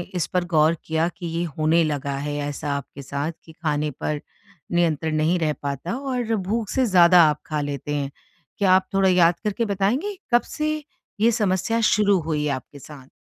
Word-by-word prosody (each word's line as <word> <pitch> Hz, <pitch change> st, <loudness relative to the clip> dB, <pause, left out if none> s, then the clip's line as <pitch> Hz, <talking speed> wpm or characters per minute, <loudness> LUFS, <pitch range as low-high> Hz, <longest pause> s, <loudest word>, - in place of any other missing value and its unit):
इस 175 Hz, -3 st, 0 dB
पर 180 Hz, -1 st, 0 dB
गौर 160 Hz, -1 st, +3 dB
किया 160 Hz, +1 st, +1 dB
कि 175 Hz, -, -7 dB
ये 165 Hz, +1 st, -2 dB
होने 160 Hz, +2 st, +3 dB
लगा 145 Hz, -2 st, -2 dB
है, 145 Hz, +1 st, -3 dB
ऐसा 145 Hz, 0 st, -3 dB
आपके 140 Hz, 0 st, -9 dB
साथ 140 Hz, +4 st, -3 dB
कि 160 Hz, -, -13 dB
खाने 150 Hz, -2 st, -1 dB
पर 145 Hz, +2 st, -3 dB, 0.5 s
नियंत्रण 160 Hz, -2 st, +1 dB
नहीं 155 Hz, +4 st, +2 dB
रह 155 Hz, -2 st, +1 dB
पाता? 140 Hz, -, -3 dB
और 250 Hz, -4 st, -2 dB
भूख 210 Hz, +2 st, -2 dB
से 260 Hz, -1 st, +1 dB
ज़्यादा 180 Hz, -4 st, +6 dB
आप 150 Hz, 0 st, -3 dB
खा 155 Hz, -1 st, -1 dB
लेते 145 Hz, 0 st, -3 dB
हैं? 140 Hz, -1 st, -2 dB, 0.5 s
क्या 195 Hz, -2 st, +3 dB
आप 185 Hz, 0 st, +3 dB
थोड़ा 195 Hz, -1 st, +4 dB
याद 175 Hz, -2 st, +4 dB
करके 210 Hz, +3 st, 0 dB
बताएँगे, 225 Hz, -, -1 dB, 0.2 s
कब 240 Hz, -, +6 dB
से 305 Hz, 0 st, -3 dB, 0.4 s
ये 230 Hz, +2 st, +4 dB
समस्या 215 Hz, +1 st, 0 dB
शुरू 205 Hz, -2 st, +3 dB
हुई 155 Hz, -2 st, -2 dB
है -, -, 0 dB
आपके 135 Hz, +2 st, -10 dB
साथ? 140 Hz, -2 st, -13 dB
170 Hz, 190 wpm, -23 LUFS, 150-200 Hz, 0.5 s, ज़्यादा